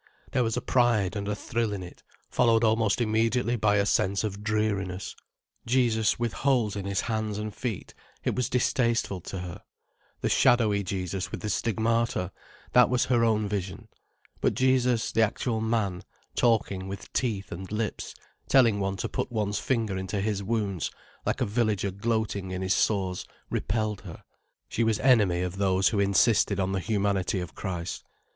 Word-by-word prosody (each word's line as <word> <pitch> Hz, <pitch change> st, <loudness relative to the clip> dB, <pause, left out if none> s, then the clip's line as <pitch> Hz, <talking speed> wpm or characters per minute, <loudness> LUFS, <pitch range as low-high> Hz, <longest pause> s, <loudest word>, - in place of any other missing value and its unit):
There 125 Hz, -, +2 dB
was 115 Hz, -1 st, -1 dB
a -, -, 0 dB
pride 115 Hz, -6 st, +2 dB
and 100 Hz, -1 st, -3 dB
a 105 Hz, -, -1 dB
thrill 115 Hz, 0 st, -2 dB
in 95 Hz, -2 st, -4 dB
it, 90 Hz, -, -11 dB, 0.3 s
followed 115 Hz, -2 st, +3 dB
almost 110 Hz, -1 st, +2 dB
immediately 115 Hz, +2 st, +1 dB
by 105 Hz, -2 st, +2 dB
a 100 Hz, -1 st, +3 dB
sense 100 Hz, 0 st, +1 dB
of 105 Hz, -1 st, -4 dB
dreariness. 100 Hz, -4 st, -1 dB, 0.5 s
Jesus 115 Hz, -3 st, +2 dB
with 120 Hz, -2 st, -1 dB
holes 125 Hz, -7 st, +1 dB
in 100 Hz, -1 st, -4 dB
His 100 Hz, 0 st, 0 dB
hands 110 Hz, -2 st, -2 dB
and 105 Hz, 0 st, -4 dB
feet: 110 Hz, -3 st, -5 dB, 0.3 s
it -, -, 0 dB
was 125 Hz, -, 0 dB
distasteful 115 Hz, -6 st, +1 dB
to 95 Hz, +2 st, -6 dB
her. 90 Hz, -2 st, -7 dB, 0.6 s
The -, -, +1 dB
shadowy 110 Hz, -4 st, +4 dB
Jesus 95 Hz, -1 st, -3 dB
with -, -, -6 dB
the 105 Hz, -, -2 dB
Stigmata: 115 Hz, -3 st, 0 dB, 0.4 s
that 125 Hz, -1 st, +6 dB
was 125 Hz, -1 st, +2 dB
her 120 Hz, -2 st, +2 dB
own 110 Hz, -2 st, +2 dB
vision. 100 Hz, +2 st, -4 dB, 0.5 s
But -, -, +1 dB
Jesus 125 Hz, -3 st, +2 dB
the 115 Hz, -, +2 dB
actual 110 Hz, +1 st, 0 dB
man, 110 Hz, -6 st, 0 dB, 0.3 s
talking 105 Hz, -5 st, +1 dB
with 100 Hz, +1 st, -8 dB
teeth 105 Hz, -6 st, -1 dB
and 95 Hz, +3 st, -7 dB
lips, 105 Hz, 0 st, -3 dB, 0.3 s
telling 115 Hz, -6 st, +5 dB
one 95 Hz, 0 st, -1 dB
to -, -, -2 dB
put -, -, -3 dB
one's 105 Hz, -3 st, -1 dB
finger 110 Hz, -7 st, -1 dB
into 95 Hz, +2 st, -3 dB
His 100 Hz, 0 st, -1 dB
wounds, 100 Hz, -4 st, -1 dB, 0.4 s
like -, -, 0 dB
a -, -, +3 dB
villager 105 Hz, -2 st, 0 dB
gloating 105 Hz, -1 st, -1 dB
in 95 Hz, 0 st, -3 dB
his 95 Hz, 0 st, +2 dB
sores, 95 Hz, -4 st, 0 dB, 0.3 s
repelled 105 Hz, -1 st, -1 dB
her. 85 Hz, -5 st, -10 dB, 0.4 s
She 115 Hz, -, 0 dB
was 110 Hz, -2 st, +1 dB
enemy 105 Hz, -10 st, +4 dB
of 90 Hz, +1 st, -4 dB
those 95 Hz, -1 st, +3 dB
who 105 Hz, -, -1 dB
insisted 100 Hz, +1 st, +3 dB
on 95 Hz, 0 st, 0 dB
the 95 Hz, -, 0 dB
humanity 100 Hz, -1 st, 0 dB
of 90 Hz, -2 st, -6 dB
Christ. 90 Hz, -4 st, -4 dB
105 Hz, 170 wpm, -27 LUFS, 95-115 Hz, 0.6 s, that